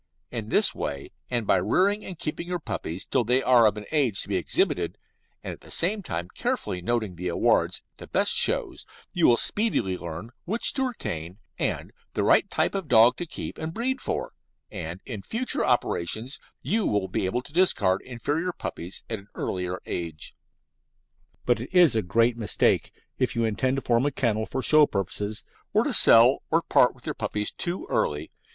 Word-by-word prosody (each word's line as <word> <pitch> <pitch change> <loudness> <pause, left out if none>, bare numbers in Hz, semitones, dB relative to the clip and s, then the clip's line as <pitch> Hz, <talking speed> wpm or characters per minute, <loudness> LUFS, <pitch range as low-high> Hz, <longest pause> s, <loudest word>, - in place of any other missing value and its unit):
In - - -5
this - - +3
way, 70 -1 -5 0.2
and 120 -3 -1
by - - +4
rearing 190 - +2
and 185 - -7
keeping 165 +2 -4
your 180 0 -1
puppies 90 - -4
till - - +1
they 125 +3 +2
are 120 -3 +6
of 105 0 0
an 105 - -7
age 135 -10 +2
to - - -8
be 100 - -1
exhibited, 90 - +1 0.5
and - - -4
at - - -14
the - - -13
same 200 +5 +1
time 85 - -4
carefully 90 - -2
noting 110 -2 -1
the 90 +1 -4
awards 85 - +1
at - - -48
the - - -9
best - - +2
shows, - - +2 0.3
you 175 - +4
will 120 - +5
speedily 160 - +1
learn 85 +7 -7
which 220 +6 0
to 265 -1 0
retain 85 - -5 0.2
and - - -1 0.2
the - - +1
right - - +4
type - - +1
of 195 -5 -3
dog 115 +1 +6
to 175 - -4
keep - - -6
and 160 +1 -5
breed 255 +3 -1
for, - - -3 0.4
and 90 -2 -6
in 110 -6 -6
future 235 - -2
operations 120 - 0 0.2
you 220 +1 +1
will 100 -2 0
be 95 0 -1
able 120 +6 -2
to 145 - -14
discard 160 - +3
inferior 145 +8 -2
puppies 90 - -5
at 110 - -3
an 100 - -17
earlier 90 0 -3
age. 80 -3 -4 1.1
But 120 -2 +2
it 120 - -6
is 175 -9 +5
a 110 - +2
great 115 +6 +2
mistake, 110 -3 +1 0.3
if 130 -2 0
you 115 -1 +1
intend 130 +5 0
to 135 - -3
form 120 +3 +2
a - - 0
kennel 110 -5 0
for 130 - -3
show 155 -1 +5
purposes, 100 +2 -4 0.3
to - - +2
sell 120 +4 +6
or 165 +1 +2
part 125 - +4
with 125 - -19
your - - -2
puppies 105 -1 -2
too 175 +2 -4
early. 75 +1 -1
120 Hz, 190 wpm, -26 LUFS, 95-160 Hz, 1.1 s, are